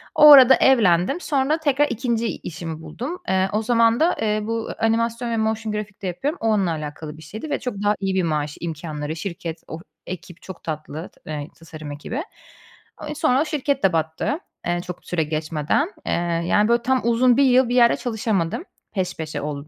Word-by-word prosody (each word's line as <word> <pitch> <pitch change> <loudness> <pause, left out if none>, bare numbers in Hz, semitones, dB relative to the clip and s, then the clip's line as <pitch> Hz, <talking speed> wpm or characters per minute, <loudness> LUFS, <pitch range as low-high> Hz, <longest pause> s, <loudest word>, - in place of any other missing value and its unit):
O 300 -1 +9
arada 265 -2 +10
evlendim. 225 - +3
Sonra 285 0 +1
tekrar 290 -1 +2
2'nci 235 -1 -1
işimi 160 -1 -7
buldum. 250 - -6
Eee, 190 0 +2
o 215 - +1
zaman 230 0 +3
da, 335 +3 +3
eee, 215 -1 +1
bu 225 +1 -3
a - - +1
animasyon 230 +1 0
ve 230 - 0
motion 220 0 -1
graphic 210 -1 -6
de 195 - -3
yapıyorum. 275 - -3
O, 225 - 0
onunla 195 -5 +2
alakalı 155 0 -6
bir - - -13
şeydi 220 - -7
ve - - 0
çok 250 -4 -4
daha 205 0 +3
iyi 195 -1 -1
bir 185 - +2
maaş, 150 -2 -2
imkânları, 155 -2 -4
şirket, 170 -1 -6
o 160 - -7 0.3
ekip 180 -1 -8
çok 190 -3 -10
tatlı, 155 +1 -5
t - - -29
eee, 145 -1 -4
tasarım 155 -2 -9
ekibi. 225 - -5 0.8
Eee, 300 - -5
sonra 265 -3 +2
o - - +1
şirket 285 -2 -1
de 190 -3 +4
battı, 160 - -1 0.3
eee, 175 0 0
çok 180 -1 -8
süre 165 -3 0
geçmeden. 155 - -1
Eee, - - +1 0.3
yani, 210 +4 +3
böyle 235 0 +3
tam, 260 0 +2
uzun 240 +1 +4
1 280 - +5
yıl 255 -1 +4
bir 245 - 0
yerde 235 -1 +6
çalışamadım. 220 - -1 0.3
Peş 185 -3 -2
peşe 155 -1 -4
oldu 145 0 -5
210 Hz, 200 wpm, -22 LUFS, 160-250 Hz, 0.8 s, arada